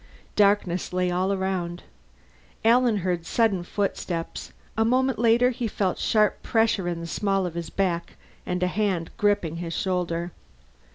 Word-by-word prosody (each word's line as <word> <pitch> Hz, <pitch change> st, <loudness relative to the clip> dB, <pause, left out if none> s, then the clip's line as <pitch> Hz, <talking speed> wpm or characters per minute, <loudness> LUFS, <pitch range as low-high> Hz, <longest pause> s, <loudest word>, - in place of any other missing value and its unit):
Darkness 200 Hz, -3 st, +2 dB
lay 180 Hz, 0 st, +1 dB
all 185 Hz, +2 st, +1 dB
around. 185 Hz, -3 st, -2 dB, 0.8 s
Alan 235 Hz, -1 st, +4 dB
heard 175 Hz, -2 st, 0 dB
sudden 205 Hz, +1 st, +1 dB
footsteps; 175 Hz, -2 st, -3 dB, 0.2 s
a 225 Hz, -, +2 dB
moment 255 Hz, +2 st, +2 dB
later 235 Hz, +2 st, +4 dB
he 240 Hz, -1 st, -3 dB
felt 195 Hz, -3 st, -1 dB
sharp 215 Hz, -2 st, +2 dB
pressure 225 Hz, -5 st, +1 dB
in 170 Hz, -1 st, -2 dB
the -, -, -5 dB
small 195 Hz, +2 st, 0 dB
of 175 Hz, -, -4 dB
his 170 Hz, -1 st, -5 dB
back 175 Hz, -3 st, -1 dB, 0.3 s
and 180 Hz, 0 st, -2 dB
a -, -, +3 dB
hand 185 Hz, -3 st, -1 dB
gripping 200 Hz, -6 st, +1 dB
his 170 Hz, -1 st, -4 dB
shoulder. 175 Hz, -2 st, -1 dB
190 Hz, 150 wpm, -25 LUFS, 175-215 Hz, 0.8 s, Alan